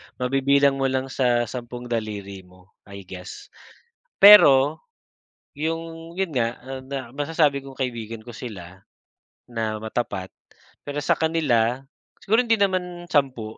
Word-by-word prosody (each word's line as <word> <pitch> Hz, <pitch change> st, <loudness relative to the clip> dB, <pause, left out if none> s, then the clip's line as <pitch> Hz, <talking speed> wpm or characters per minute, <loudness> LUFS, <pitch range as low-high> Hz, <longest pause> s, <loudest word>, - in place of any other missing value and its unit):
Mabibilang 135 Hz, +2 st, +2 dB
mo 135 Hz, -, +2 dB
lang 130 Hz, 0 st, -2 dB
sa 120 Hz, -3 st, +2 dB
sampung 120 Hz, +1 st, -7 dB
daliri 105 Hz, -4 st, -4 dB
mo, 90 Hz, +1 st, -21 dB, 0.2 s
I 100 Hz, 0 st, -10 dB
guess. 90 Hz, 0 st, -10 dB, 0.7 s
Pero, 150 Hz, -8 st, +8 dB, 0.7 s
yung, 165 Hz, +2 st, -5 dB
'yon 190 Hz, -3 st, -2 dB
nga, 120 Hz, -3 st, -1 dB
ah, 130 Hz, +1 st, -7 dB
na 130 Hz, -2 st, -7 dB
masasabi 145 Hz, 0 st, +1 dB
kong 135 Hz, -1 st, -12 dB
kaibigan 115 Hz, -3 st, -5 dB
ko 120 Hz, -, -10 dB
sila 95 Hz, -7 st, -9 dB, 0.7 s
na 110 Hz, -2 st, -3 dB
matapat. 110 Hz, -4 st, -4 dB, 0.6 s
Pero 145 Hz, 0 st, -4 dB
sa -, -, +1 dB
kanila, 135 Hz, -7 st, +1 dB, 0.4 s
siguro 220 Hz, +4 st, +3 dB
hindi 225 Hz, -1 st, +3 dB
naman 180 Hz, -3 st, -1 dB
10 130 Hz, -8 st, -1 dB
130 Hz, 130 wpm, -23 LUFS, 115-150 Hz, 0.7 s, Pero